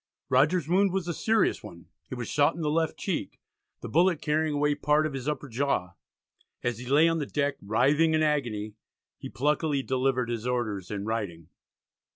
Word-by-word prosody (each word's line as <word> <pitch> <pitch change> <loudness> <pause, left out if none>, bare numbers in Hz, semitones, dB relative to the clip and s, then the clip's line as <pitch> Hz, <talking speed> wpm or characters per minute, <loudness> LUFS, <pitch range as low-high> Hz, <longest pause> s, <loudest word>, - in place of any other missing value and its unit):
Rogers's 145 +5 +3
wound 190 +3 +3
was 190 -2 -2
a 170 - -1
serious 220 +7 +1
one; 85 0 -11 0.2
he - - -5
was 120 -2 -5
shot 145 +2 +2
in 170 - -6
the 150 -1 0
left 160 0 0
cheek, - - -4 0.4
the - - -6
bullet 170 0 +3
carrying 155 0 0
away 150 0 +2
part 150 +1 +2
of 155 - -3
his 135 0 -5
upper 150 -1 -4
jaw. 120 -8 -1 0.7
As 120 -2 -1
he 125 - -8
lay 145 +5 +5
on 165 0 +1
the 145 - -3
deck 145 -1 -1
writhing 145 +10 +2
in 155 - +2
agony, 120 -9 -1 0.5
he - - -7
pluckily 150 +1 0
delivered 130 -2 0
his 120 0 -3
orders 110 -7 -2
in 100 -1 -4
writing. 100 -8 -4
140 Hz, 190 wpm, -27 LUFS, 120-155 Hz, 0.7 s, lay